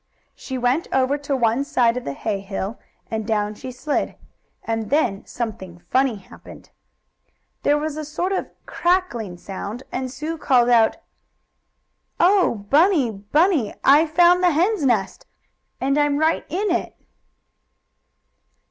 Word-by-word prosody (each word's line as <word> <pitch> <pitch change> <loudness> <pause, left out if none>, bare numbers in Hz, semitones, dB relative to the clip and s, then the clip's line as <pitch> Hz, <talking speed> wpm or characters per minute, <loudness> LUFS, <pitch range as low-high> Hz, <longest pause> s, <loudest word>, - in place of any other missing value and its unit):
She 260 - -6
went 250 +6 0
over 265 +1 +2
to 285 -1 -2
one 235 +1 +1
side 245 -5 +2
of 250 - -5
the 140 - -3
hay 205 +7 -3
hill, 195 +2 -5 0.3
and 220 -1 -2
down 210 -1 -1
she 255 +4 -8
slid. 285 +4 -2 0.5
And 225 -2 -3
then 240 -9 +1
something 210 -7 -6
funny 260 -2 +2
happened. 195 - -14 0.9
There 290 - +3
was 305 0 -3
a 310 - -4
sort 325 +5 -3
of 385 - -2 0.2
crackling 335 - -1
sound, 200 +6 -7
and 260 0 -3
Sue 310 +5 -5
called 245 -5 +3
out: 230 -2 +4 1.2
"Oh, 350 - +3
Bunny! 305 - +4
Bunny! 255 - +1
I've 300 +4 +5
found 350 +3 +5
the 360 - +5
hen's 350 +3 +1
nest, 210 -8 0 0.5
and 275 +2 +1
I'm 290 -1 +2
right 315 +2 +1
in 390 +4 -1
it!" - - -2
265 Hz, 140 wpm, -22 LUFS, 220-310 Hz, 1.2 s, I've